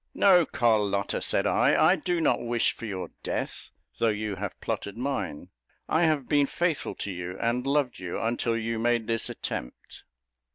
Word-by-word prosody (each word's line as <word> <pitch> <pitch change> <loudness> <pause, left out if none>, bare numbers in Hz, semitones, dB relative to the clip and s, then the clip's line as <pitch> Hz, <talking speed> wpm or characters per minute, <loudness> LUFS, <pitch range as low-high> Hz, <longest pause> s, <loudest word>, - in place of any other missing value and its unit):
"No, 180 -6 +5
Carlotta," 105 -5 +1
said - - +2
I; - - +3
"I 185 - +5
do 175 0 -1
not 160 - +2
wish 120 -1 +1
for 115 - -8
your 95 -3 -5
death, - - -4 0.3
though 115 - +3
you 105 -2 -2
have 100 0 -5
plotted 100 +1 -4
mine. 125 - -3 0.4
I 165 +2 +3
have 150 -5 +1
been 145 -1 +3
faithful 170 -1 -1
to 100 - -4
you, 90 0 -6
and 125 +3 0
loved 140 -5 +1
you, 90 -2 -4
until 115 0 0
you 115 0 -2
made 120 0 +1
this 115 0 0
attempt." - - -6
115 Hz, 170 wpm, -27 LUFS, 105-140 Hz, 0.4 s, No